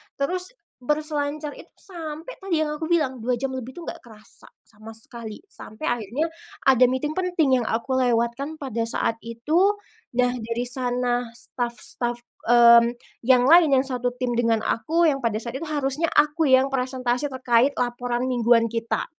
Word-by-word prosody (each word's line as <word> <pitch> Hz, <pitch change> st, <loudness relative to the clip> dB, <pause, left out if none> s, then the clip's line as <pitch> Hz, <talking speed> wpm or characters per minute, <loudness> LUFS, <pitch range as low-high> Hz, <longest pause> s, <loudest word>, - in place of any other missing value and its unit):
terus 365 Hz, -, -2 dB, 0.3 s
berselancar 300 Hz, +1 st, -2 dB
itu -, -, -14 dB
sampai 325 Hz, +2 st, -8 dB
tadi 380 Hz, -4 st, -1 dB
yang 305 Hz, -1 st, 0 dB
aku 315 Hz, +2 st, -5 dB
bilang 265 Hz, -8 st, +1 dB
2 245 Hz, +1 st, 0 dB
jam 265 Hz, +1 st, -3 dB
lebih 255 Hz, -1 st, -5 dB
tuh 345 Hz, -, -7 dB
nggak -, -, -7 dB
kerasa 220 Hz, -3 st, -14 dB, 0.2 s
sama 220 Hz, +1 st, -12 dB
sekali, 225 Hz, -1 st, -8 dB
sampai 310 Hz, -, -9 dB
akhirnya 240 Hz, +4 st, -1 dB, 0.4 s
ada 255 Hz, -2 st, +6 dB
meeting 280 Hz, +4 st, -2 dB
penting 330 Hz, -8 st, +1 dB
yang 230 Hz, -, -4 dB
aku 235 Hz, +4 st, -1 dB
lewatkan 245 Hz, +5 st, 0 dB
pada 255 Hz, -6 st, -4 dB
saat 230 Hz, -, +1 dB
itu, 315 Hz, -, +1 dB, 0.4 s
nah 245 Hz, 0 st, +3 dB
dari 235 Hz, 0 st, -3 dB
sana 245 Hz, -1 st, -1 dB
staf-staf, 240 Hz, 0 st, -3 dB, 0.3 s
mmm, 235 Hz, 0 st, +7 dB, 0.2 s
yang 250 Hz, 0 st, +4 dB
lain 330 Hz, +2 st, +7 dB
yang 265 Hz, -, +2 dB
1 250 Hz, -2 st, 0 dB
tim 250 Hz, -1 st, -1 dB
dengan 230 Hz, -2 st, +1 dB
aku 325 Hz, +8 st, +1 dB
yang 275 Hz, -4 st, +2 dB
pada 225 Hz, -3 st, 0 dB
saat 235 Hz, +1 st, -5 dB
itu 330 Hz, -, -5 dB
harusnya 295 Hz, +2 st, 0 dB
aku 300 Hz, 0 st, +3 dB
yang 260 Hz, +1 st, +6 dB
presentasi 255 Hz, +1 st, -1 dB
terkait 260 Hz, +1 st, +2 dB
laporan 245 Hz, 0 st, -1 dB
mingguan 240 Hz, -2 st, +3 dB
kita. 230 Hz, 0 st, -2 dB
255 Hz, 160 wpm, -24 LUFS, 235-300 Hz, 0.4 s, mmm